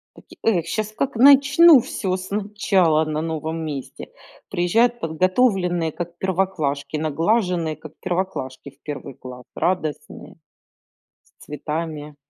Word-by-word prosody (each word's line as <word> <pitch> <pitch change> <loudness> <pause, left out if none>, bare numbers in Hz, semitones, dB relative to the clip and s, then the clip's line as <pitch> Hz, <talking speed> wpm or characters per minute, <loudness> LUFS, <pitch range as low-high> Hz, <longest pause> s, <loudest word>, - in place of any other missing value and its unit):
Поти - - -17
эх, 180 -8 +2
щас 215 +4 -3
как 260 +5 -3
начну 285 +5 +7
всё 190 -5 -3
сначала 190 -4 +1
на 155 0 -2
новом 160 0 -4
месте. 140 -4 -7 0.4
Приезжают 230 +8 +2
подготовленные, 180 -1 +1
как 175 +1 -7
первоклашки, 170 -7 -1
наглаженные, 165 +1 0
как 155 0 -12
первоклашки 175 -8 -4
в 140 - -31
1 145 -2 -7
класс, 125 0 -11
радостные 165 -5 -3 1.0
с - - -13
цветами. 150 0 -5
175 Hz, 110 wpm, -22 LUFS, 155-200 Hz, 1.0 s, начну